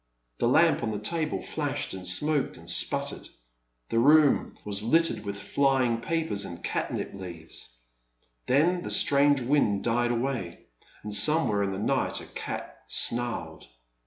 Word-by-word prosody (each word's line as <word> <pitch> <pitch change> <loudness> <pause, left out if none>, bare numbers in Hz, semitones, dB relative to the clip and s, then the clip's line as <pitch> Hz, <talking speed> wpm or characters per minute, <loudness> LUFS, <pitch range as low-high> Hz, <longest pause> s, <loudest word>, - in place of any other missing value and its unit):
The - - +2
lamp - - +4
on 115 - -2
the 105 - -3
table 155 +9 -2
flashed 145 -3 -3
and 95 -1 -7
smoked 145 - 0
and 85 - -15
sputtered; - - 0 0.6
the 115 - +1
room 150 +3 +4
was 100 -1 -2
littered 165 +9 +2
with 100 -1 -5
flying 130 -4 +1
papers 160 -10 -2
and 85 0 -8
catnip - - -3
leaves. 85 -9 -10 0.7
Then 170 +7 +2
the - - -6
strange 140 -1 +4
wind 120 -6 +1
died 120 +1 +1
away, 120 -7 -3 0.4
and 105 0 -5
somewhere 110 -1 +3
in 100 -1 -1
the 95 - -4
night 100 - 0
a - - -9
cat - - -7
snarled. 120 - -1
120 Hz, 145 wpm, -27 LUFS, 100-145 Hz, 0.7 s, lamp